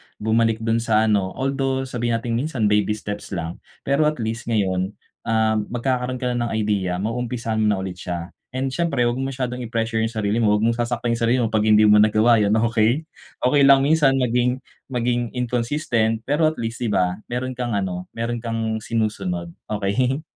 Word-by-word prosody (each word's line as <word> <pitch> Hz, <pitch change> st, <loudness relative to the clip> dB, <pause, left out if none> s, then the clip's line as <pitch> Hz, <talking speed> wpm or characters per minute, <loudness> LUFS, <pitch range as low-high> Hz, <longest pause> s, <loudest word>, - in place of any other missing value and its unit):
Bumalik 110 Hz, +1 st, +1 dB
dun 115 Hz, 0 st, +1 dB
sa 110 Hz, -1 st, +2 dB
ano, 100 Hz, -4 st, +1 dB
although 135 Hz, 0 st, -1 dB
sabihin 120 Hz, -3 st, -2 dB
natin 115 Hz, 0 st, -1 dB
minsan 125 Hz, -7 st, 0 dB
baby 105 Hz, 0 st, +2 dB
steps 105 Hz, -2 st, -6 dB
lang, 85 Hz, 0 st, -5 dB, 0.2 s
pero 140 Hz, +2 st, +2 dB
at 150 Hz, -, 0 dB
least 115 Hz, -1 st, -4 dB
ngayon, 95 Hz, -3 st, 0 dB, 0.3 s
ah, 110 Hz, -1 st, +2 dB
magkakaroon 125 Hz, +3 st, -2 dB
ka 125 Hz, -, 0 dB
na 120 Hz, -1 st, -1 dB
ng -, -, -5 dB
idea, 100 Hz, -4 st, 0 dB
ma-uumpisahan 115 Hz, +2 st, -2 dB
mo 110 Hz, -, +2 dB
na 100 Hz, -2 st, +1 dB
ulit 90 Hz, -1 st, -6 dB
siya. 85 Hz, -1 st, -5 dB, 0.2 s
And 130 Hz, +1 st, -1 dB
syempre 140 Hz, -3 st, 0 dB
wag 120 Hz, +1 st, 0 dB
mo 135 Hz, -, -1 dB
masyadong 125 Hz, -2 st, -3 dB
i-pressure 115 Hz, -1 st, -2 dB
yung 110 Hz, 0 st, +1 dB
sarili 105 Hz, +1 st, 0 dB
mo, 105 Hz, -2 st, +3 dB
wag 105 Hz, -, 0 dB
mong 115 Hz, +1 st, +1 dB
sasaktan 120 Hz, 0 st, -1 dB
yung 115 Hz, -, -1 dB
sarili 115 Hz, +2 st, +2 dB
mo 115 Hz, -, -1 dB
'pag 110 Hz, -1 st, +1 dB
hindi 110 Hz, 0 st, +6 dB
mo 105 Hz, 0 st, +6 dB
nagawa 110 Hz, +2 st, +4 dB
yun, 105 Hz, 0 st, +2 dB
okey? 115 Hz, +5 st, +2 dB, 0.4 s
Okey 140 Hz, +3 st, +4 dB
lang 135 Hz, -1 st, +6 dB
minsan 145 Hz, -2 st, +4 dB
maging 125 Hz, 0 st, +1 dB, 0.2 s
maging 120 Hz, -1 st, -1 dB
inconsistent, 120 Hz, -2 st, 0 dB
pero 150 Hz, +5 st, +2 dB
at 155 Hz, -, -1 dB
least, 115 Hz, -3 st, -4 dB
'di 120 Hz, -, -1 dB
ba? 90 Hz, -1 st, +1 dB
Meron 125 Hz, +2 st, -3 dB
kang 120 Hz, -3 st, -3 dB
ano, 90 Hz, -2 st, -3 dB
meron 115 Hz, +1 st, -2 dB
kang 115 Hz, -1 st, -2 dB
sinusunod, 100 Hz, -7 st, -2 dB, 0.2 s
okey? 125 Hz, +8 st, 0 dB
115 Hz, 190 wpm, -22 LUFS, 105-125 Hz, 0.4 s, hindi